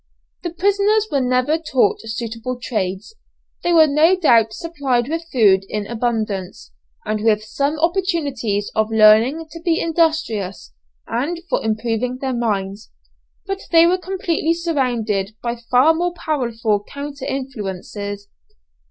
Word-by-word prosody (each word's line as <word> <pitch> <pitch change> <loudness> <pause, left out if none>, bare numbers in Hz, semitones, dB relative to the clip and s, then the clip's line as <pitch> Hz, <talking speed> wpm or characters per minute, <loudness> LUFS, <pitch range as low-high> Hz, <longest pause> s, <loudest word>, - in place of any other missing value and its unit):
The 345 - -3
prisoners 405 +5 +2
were 280 - +1
never 255 +5 +1
taught 265 -9 +1
suitable 230 +2 -5
trades, 205 - -3 0.5
they 345 - 0
were 325 -2 +7
no 310 +5 +4
doubt 235 -11 +4
supplied 265 -3 -1
with 330 +2 -4
food 200 -6 +4
in 210 -1 -3
abundance, 220 - -3 0.3
and 215 0 -2
with 215 -1 +2
some 280 +7 -1
opportunities 305 - -1
of 220 0 +1
learning 225 +8 +5
to 335 - -8
be 335 -1 +1
industrious 310 - -1 0.3
and 285 +9 -2
for - - -1
improving 225 +3 -1
their 265 0 -3
minds, 205 -4 -2 0.6
but 390 0 -4
they 330 -1 +6
were 365 +2 +2
completely 345 -3 -1
surrounded 240 - -1
by 235 0 -1
far 250 +6 +3
more 350 +2 -1
powerful 230 -10 -1
counter 285 +4 -7
influences. 205 -5 -5
250 Hz, 130 wpm, -20 LUFS, 215-325 Hz, 0.6 s, were